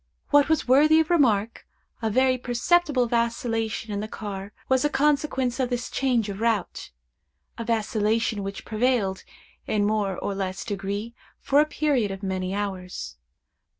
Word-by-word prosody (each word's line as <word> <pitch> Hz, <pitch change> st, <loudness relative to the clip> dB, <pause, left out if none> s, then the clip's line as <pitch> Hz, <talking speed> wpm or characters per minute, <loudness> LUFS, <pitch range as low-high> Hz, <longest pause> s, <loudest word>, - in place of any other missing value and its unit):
What 290 Hz, 0 st, +5 dB
was 315 Hz, -4 st, +1 dB
worthy 300 Hz, +5 st, +6 dB
of 320 Hz, +2 st, +1 dB
remark, 230 Hz, -9 st, +2 dB, 0.3 s
a 225 Hz, -, 0 dB
very 255 Hz, +3 st, +3 dB
perceptible 255 Hz, +3 st, +1 dB
vacillation 230 Hz, -2 st, -1 dB
in 200 Hz, -, -2 dB
the 215 Hz, -, -4 dB
car 200 Hz, -2 st, -6 dB, 0.2 s
was 260 Hz, 0 st, +2 dB
a 295 Hz, -, +2 dB
consequence 280 Hz, -3 st, +1 dB
of 255 Hz, -2 st, 0 dB
this 245 Hz, -1 st, -3 dB
change 245 Hz, -5 st, +1 dB
of 200 Hz, -1 st, -5 dB
route—a 65 Hz, -, -5 dB
vacillation 220 Hz, -1 st, 0 dB
which 195 Hz, 0 st, -6 dB
prevailed, 215 Hz, -4 st, 0 dB, 0.4 s
in 210 Hz, -1 st, +1 dB
a -, -, +2 dB
more 205 Hz, -3 st, 0 dB
or 200 Hz, -, -3 dB
less 190 Hz, -1 st, -4 dB
degree, 205 Hz, +3 st, -4 dB, 0.3 s
for 280 Hz, +1 st, +2 dB
a 305 Hz, -, +1 dB
period 285 Hz, -8 st, 0 dB
of 195 Hz, +1 st, -7 dB
many 185 Hz, -1 st, -2 dB
hours. 190 Hz, -2 st, -4 dB
225 Hz, 150 wpm, -25 LUFS, 200-260 Hz, 0.4 s, worthy